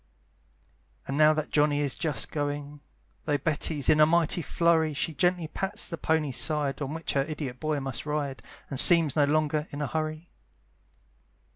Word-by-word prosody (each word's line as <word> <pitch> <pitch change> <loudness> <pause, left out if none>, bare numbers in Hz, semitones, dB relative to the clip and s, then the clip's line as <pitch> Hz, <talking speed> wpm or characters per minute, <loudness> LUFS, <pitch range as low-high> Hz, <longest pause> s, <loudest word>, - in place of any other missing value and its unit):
And 135 - -3
now 155 +1 +5
that 155 -1 -4
Johnny 145 -1 +2
is 145 -3 0
just 150 -10 -2
going, 145 0 -4 0.5
Though 145 -2 +1
Betty's 150 0 -2
in 155 - +4
a 155 - +7
mighty 170 +1 +2
flurry, 160 -2 +1
She 160 - -2
gently 175 +2 0
pats 195 +6 -4
the 170 - -5
pony's 155 -5 -1
side, 140 +1 0
On 140 +2 -4
which 165 - -4
her 140 - +2
idiot 140 -4 -6
boy 155 -1 -2
must 135 +1 -4
ride, 145 -3 -3 0.3
And 135 - +1
seems 165 -5 +7
no 150 -2 +3
longer 150 +1 0
in 145 - -8
a 150 - -1
hurry. 155 +3 -4
150 Hz, 170 wpm, -27 LUFS, 145-160 Hz, 0.5 s, a